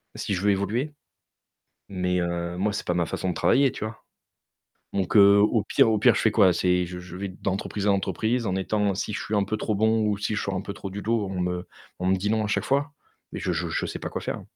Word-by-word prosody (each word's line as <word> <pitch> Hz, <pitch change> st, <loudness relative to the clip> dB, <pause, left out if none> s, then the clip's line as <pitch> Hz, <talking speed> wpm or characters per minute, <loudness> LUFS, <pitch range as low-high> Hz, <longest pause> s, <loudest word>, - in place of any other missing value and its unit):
si 100 Hz, -, -3 dB
je 90 Hz, -, -1 dB
veux 105 Hz, -, +2 dB
évoluer? 110 Hz, +10 st, -1 dB, 1.0 s
Mais, 90 Hz, -1 st, -1 dB
heu, 85 Hz, 0 st, -3 dB
moi 105 Hz, +2 st, 0 dB
c'est -, -, -5 dB
pas 90 Hz, -, +1 dB
ma 85 Hz, -1 st, +1 dB
façon 95 Hz, -, -3 dB
de 90 Hz, -, -1 dB
travailler, 135 Hz, +10 st, +3 dB
tu 110 Hz, -, -5 dB
vois? 110 Hz, 0 st, -8 dB, 0.9 s
Donc 100 Hz, +3 st, +1 dB
heu, 100 Hz, 0 st, +8 dB
au 105 Hz, +1 st, +3 dB
pire 115 Hz, -, +3 dB
au 110 Hz, -, +2 dB
pire, 105 Hz, -, +5 dB
je -, -, 0 dB
fais 110 Hz, -, +3 dB
quoi? 100 Hz, -5 st, +5 dB
C'est 90 Hz, 0 st, +2 dB
je 90 Hz, +1 st, -7 dB
je 90 Hz, 0 st, -9 dB
vais 100 Hz, -, -3 dB
d'entreprise 100 Hz, +2 st, -3 dB
à -, -, +5 dB
entreprise 110 Hz, +5 st, 0 dB
en 95 Hz, -2 st, -1 dB
étant 100 Hz, +1 st, 0 dB
si 105 Hz, -, -3 dB
je -, -, -3 dB
suis 105 Hz, -, -3 dB
un 100 Hz, -, +3 dB
peu 105 Hz, +2 st, -2 dB
trop 105 Hz, 0 st, -1 dB
bon 110 Hz, +1 st, +2 dB
ou 105 Hz, -1 st, 0 dB
si 105 Hz, +1 st, -2 dB
je -, -, -1 dB
sors 95 Hz, -, -2 dB
un 95 Hz, -, -2 dB
peu 100 Hz, -, -6 dB
trop 100 Hz, -1 st, -7 dB
du 100 Hz, +2 st, -6 dB
lot 115 Hz, -2 st, 0 dB
on 95 Hz, -1 st, -3 dB
me 90 Hz, 0 st, -2 dB, 0.3 s
on 90 Hz, -, -3 dB
me 95 Hz, -, +4 dB
dit 95 Hz, +2 st, -2 dB
non 110 Hz, 0 st, +1 dB
à -, -, -1 dB
chaque 105 Hz, -, -1 dB
fois? 140 Hz, +2 st, 0 dB, 0.4 s
Mais -, -, -4 dB
je -, -, -1 dB
je -, -, -2 dB
je -, -, -1 dB
sais -, -, -5 dB
pas -, -, -5 dB
quoi -, -, -5 dB
faire. -, -, -4 dB
100 Hz, 270 wpm, -25 LUFS, 90-110 Hz, 1.0 s, heu